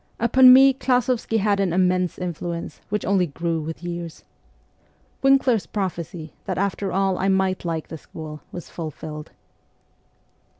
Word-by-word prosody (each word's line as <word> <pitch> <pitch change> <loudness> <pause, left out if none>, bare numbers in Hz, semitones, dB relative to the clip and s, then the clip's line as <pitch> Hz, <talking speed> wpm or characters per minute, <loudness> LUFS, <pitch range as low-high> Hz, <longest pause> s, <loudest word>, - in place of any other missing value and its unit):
Upon 255 +3 +7
me 270 +1 +8
Klas6vsky 250 -3 0
had 205 -1 +1
an 195 -3 +1
immense 180 0 +1
influence, 170 -1 -5
which 210 0 -2
only 190 -2 +2
grew 165 +2 -2
with 160 +2 -7
years. 170 -1 -6 1.0
Winkler's 265 - +3
prophecy, 170 -4 -4
that, 185 - -3
after 200 0 -1
all, 195 -1 0
I 190 - 0
might 190 -1 +1
like 165 -2 -3
the 160 - -7
school, 155 -1 -9
was 175 - -8
fulfilled. 155 -2 -7
185 Hz, 135 wpm, -23 LUFS, 170-205 Hz, 1.0 s, me